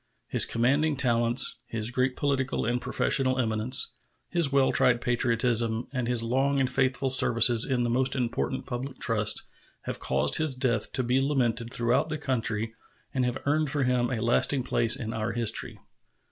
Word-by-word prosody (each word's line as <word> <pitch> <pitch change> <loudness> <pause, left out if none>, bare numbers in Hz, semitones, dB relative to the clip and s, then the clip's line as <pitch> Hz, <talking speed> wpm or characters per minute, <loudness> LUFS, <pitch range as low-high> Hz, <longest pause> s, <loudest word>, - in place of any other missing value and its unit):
His - - +2
commanding 140 +6 0
talents, 120 -1 +2
his 115 0 -3
great 125 +1 -1
political 135 -2 -2
and 120 +1 -1
professional 130 +2 0
eminence, 115 +1 +1 0.4
his 170 -6 +1
well 135 -1 +2
tried 120 -1 +3
patriotism, 120 -1 -1
and 125 -3 -2
his 120 -2 0
long 135 +4 0
and 130 - +1
faithful 130 0 -1
services 115 -2 +5
in 125 -2 -1
the 120 - -1
most 130 +2 0
important 130 +1 -3
public 130 +1 -6
trusts 105 -3 +2 0.4
have - - -6
caused 70 - +1
his 155 -4 +1
death 125 -5 -1
to 130 0 -1
be 125 +2 +1
lamented 120 -4 -1
throughout 120 +5 0
the 155 - -3
country 115 -5 -2 0.4
and 130 -2 0
have 125 +1 -2
earned 150 +1 +1
for 145 -1 -1
him 125 -1 0
a 125 -4 -3
lasting 125 +3 +2
place 120 -2 +2
in 115 -4 -6
our 110 +1 -3
history. 115 -2 0
125 Hz, 170 wpm, -26 LUFS, 115-135 Hz, 0.4 s, services